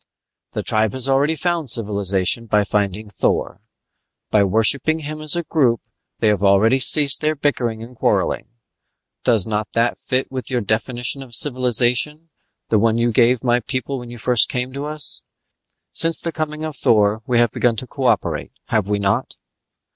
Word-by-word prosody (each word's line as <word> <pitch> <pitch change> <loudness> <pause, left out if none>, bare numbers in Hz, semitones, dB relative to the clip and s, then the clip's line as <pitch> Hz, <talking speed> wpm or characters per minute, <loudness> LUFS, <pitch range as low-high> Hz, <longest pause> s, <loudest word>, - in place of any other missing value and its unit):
"The - - -4
tribe 110 -1 +1
has 130 0 +2
already 140 +4 +1
found 170 -3 -2
civilization 100 0 +1
in 105 -1 +2
finding 105 +1 -2
Thor. 100 - -2 0.7
By 105 -2 +4
worshipping 115 - +2
Him 155 +1 -7
as 155 +2 +3
a 170 - -2
group 130 -9 +1 0.4
they 110 - 0
have 105 -2 0
already 100 +6 +3
ceased 140 +3 +5
their 155 0 0
bickering 120 -6 -2
and 125 +2 -13
quarreling. - - -1 0.8
Does 110 -6 +2
not 105 -1 -3
that 115 +1 0
fit 130 +1 -1
in - - -16
with 130 -4 -4
your 125 -2 -1
definition 120 +5 -1
of 125 -3 -5
civilization, 130 +5 +2 0.4
the 110 - +2
one 115 +1 +1
you 120 0 +1
gave 120 +1 +2
my 120 -1 +2
people 130 +2 -4
when 120 -1 -10
you 120 - -10
first 120 0 +3
came 125 +1 -4
to 140 +1 -5
us? 150 -1 0 0.7
Since 165 0 +2
the 170 - -4
coming 155 -1 -5
of 155 -2 -5
Thor 105 -3 +2
we 125 - +1
have 120 -2 +3
begun 120 -2 0
to 120 - -5
cooperate, 130 -1 -2 0.2
have 105 -2 0
we 105 - 0
not?" 100 -1 -1
120 Hz, 175 wpm, -19 LUFS, 110-140 Hz, 0.8 s, ceased